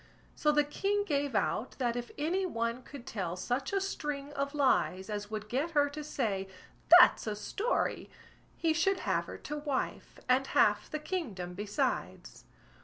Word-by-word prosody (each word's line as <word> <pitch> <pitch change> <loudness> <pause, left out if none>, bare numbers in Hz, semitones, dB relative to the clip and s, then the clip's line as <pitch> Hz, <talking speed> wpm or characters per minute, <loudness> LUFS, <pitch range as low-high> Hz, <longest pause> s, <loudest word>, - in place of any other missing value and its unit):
So 300 - +2
the 295 0 +4
king 395 +8 0
gave 285 - -1
out, 210 +4 0
that 240 -3 0
if 240 0 -4
any 340 +6 0
one 230 -7 -2
could 255 -1 -11
tell 180 -5 -3
such 245 +8 -2
a 395 - +2
string 295 -7 -4
of 280 +1 -2
lies, 215 -8 +2
as 205 0 -4
would 215 -1 -5
get 270 +9 -1
her 290 0 +5
to 300 +1 -6
say, 210 -10 -2 0.5
"That's 350 - +6
a 210 - -1
story", 415 - -1 0.5
he 325 -1 +2
should 375 +4 +1
have - - 0
her - - -8
to 295 - -6
wife, 290 -3 -3
and 260 +2 +3
half - - +3
the 305 - -2
kingdom 250 - -4
besides. 205 +2 -3
275 Hz, 170 wpm, -31 LUFS, 215-305 Hz, 0.5 s, That's